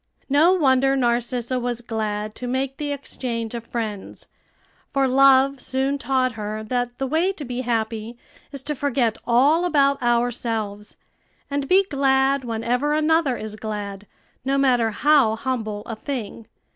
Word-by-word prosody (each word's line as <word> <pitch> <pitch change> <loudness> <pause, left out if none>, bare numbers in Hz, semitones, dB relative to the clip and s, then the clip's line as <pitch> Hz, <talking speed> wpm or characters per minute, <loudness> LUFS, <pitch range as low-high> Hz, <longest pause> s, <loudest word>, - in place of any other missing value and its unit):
No 310 +6 +5
wonder 270 -5 +3
Narcissa 245 0 0
was 240 -1 -3
glad 215 -2 -3
to 250 - -6
make 265 +2 -2
the 295 -1 -3
exchange 240 -5 -4
of 235 -1 -5
friends; 215 -4 -5 0.6
for 275 -1 +2
Love 270 +1 +5
soon 270 +2 -1
taught 260 0 +1
her 215 -1 -5
that 245 +2 -2
the 270 - -2
way 320 +8 +1
to 305 -6 -7
be 250 0 -4
happy 230 -1 -2 0.3
is 275 -2 -7
to 300 - -2
forget 255 -5 0
all 280 +8 +4
about 280 -5 +2
ourselves, 230 -4 -1 0.5
and 280 -1 -1
be 385 +2 +6
glad 270 -2 +2
whenever 245 +5 -1
another 310 -4 +2
is 215 -1 -6
glad, 205 -2 -6 0.4
no 270 +1 0
matter 250 -4 +3
how 265 -1 +3
humble 225 -4 -3
a 225 - -5
thing. 230 -2 -6
250 Hz, 145 wpm, -23 LUFS, 225-275 Hz, 0.6 s, be